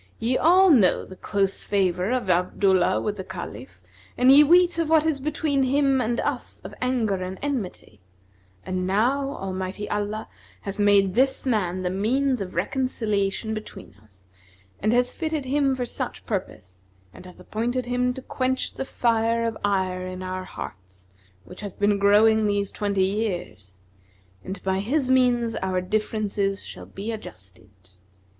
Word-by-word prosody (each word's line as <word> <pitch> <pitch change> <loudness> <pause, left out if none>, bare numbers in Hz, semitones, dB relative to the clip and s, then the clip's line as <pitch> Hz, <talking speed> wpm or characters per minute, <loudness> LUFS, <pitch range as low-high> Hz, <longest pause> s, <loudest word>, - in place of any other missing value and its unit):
Ye 240 +3 0
all 365 +5 +5
know 210 - +4
the 185 - -11
close 195 0 -1
favour 185 -1 0
of 250 -4 -1
Abdullah 185 +1 +2
with 210 -1 -3
the 190 - -5
Caliph 130 - -8 0.4
and 255 +1 +6
ye 285 +2 +9
weet 345 +2 +4
of 325 -2 0
what 320 -1 +4
is 315 -3 +1
between 290 0 0
him 270 0 +2
and 235 0 -1
us - - -3
of - - -9
anger 240 -6 0
and 185 +1 -5
enmity; 220 - -4 0.7
and 185 0 -2
now 265 +8 +1
Almighty 190 +1 -4
Allah 210 +1 -2 0.3
hath 200 +1 -6
made 200 -2 +4
this 265 +4 +2
man 185 -7 0
the 180 - -1
means 250 +6 0
of 185 -2 -6
reconciliation 215 0 -1
between 215 - -8
us; 95 -3 -21 0.5
and 215 - +1
hath 245 +1 +2
fitted 315 -4 -3
him 275 0 +1
for 250 -1 -2
such - - -6
purpose 95 - -5 0.3
and 185 - -12
hath 180 - -14
appointed 235 +6 -2
him 250 0 0
to 265 - -8
quench 260 0 -2
the 270 - -4
fire 230 -2 +1
of 230 -1 -2
ire 185 -2 0
in 185 0 -6
our 185 0 -4
hearts, 95 - -10 0.4
which 180 - -11
hath 200 -3 -7
been 205 0 +2
growing 215 +2 +5
these 205 -1 0
twenty 200 -2 0
years; 175 - -4 0.6
and 190 0 -7
by 190 0 0
his 260 +5 0
means 245 -3 +3
our 185 -1 -1
differences 205 0 -1
shall - - -9
be 205 +4 -5
adjusted. 95 - -12
210 Hz, 160 wpm, -24 LUFS, 185-255 Hz, 0.7 s, ye